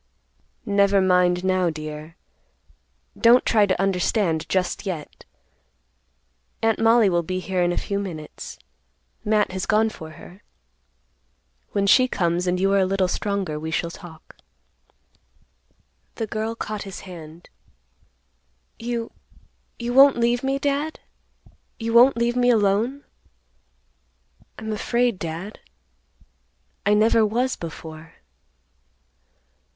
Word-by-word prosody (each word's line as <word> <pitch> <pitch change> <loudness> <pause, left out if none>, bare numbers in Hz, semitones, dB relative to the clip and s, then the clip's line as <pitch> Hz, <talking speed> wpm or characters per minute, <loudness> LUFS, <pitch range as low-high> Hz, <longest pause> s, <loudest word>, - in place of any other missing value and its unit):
"Never 200 -1 +3
mind, 180 -1 +3
now, 185 -2 +2
dear. 155 0 -7 1.0
Don't 240 +1 +5
try 210 -3 +3
to 185 - 0
understand 185 -3 0
just 185 -1 -1
yet. 165 -6 -6 1.4
Aunt 225 -1 +2
Mollie 225 -1 +5
will 175 -2 +2
be 185 +2 -3
here 185 -1 -2
in 175 0 +2
a - - -3
few 200 0 -2
minutes. 165 -6 -7 0.7
Matt 210 -2 +1
has 190 0 -4
gone 220 +1 +3
for 160 -6 -10
her. 185 +5 -14 1.3
When 200 -1 +1
she 255 +6 +5
comes 175 -5 -1
and 180 0 0
you 195 +1 +2
are 200 - +4
a 190 - +3
little 190 -1 +1
stronger, 195 -5 -2
we 160 +1 -5
shall 170 +1 -2
talk." 165 -3 -13 1.8
The 225 - -3
girl 220 +1 -3
caught 215 -2 -5
his 195 -2 -8
hand; 170 -2 -11 1.3
"You—you 235 0 -7
won't 275 0 +7
leave 240 +1 +1
me, 270 0 0
Dad? 285 +3 -2 0.8
You 230 0 -3
won't 245 +2 +6
leave 235 +1 +1
me 245 0 +3
alone? 225 +5 +1 1.5
I'm 220 0 -5
afraid, 235 -1 0
Dad. 170 +6 -6 1.3
I 210 - +5
never 220 +1 +4
was 245 +5 0
before." 160 -1 -9
200 Hz, 115 wpm, -23 LUFS, 180-230 Hz, 1.8 s, won't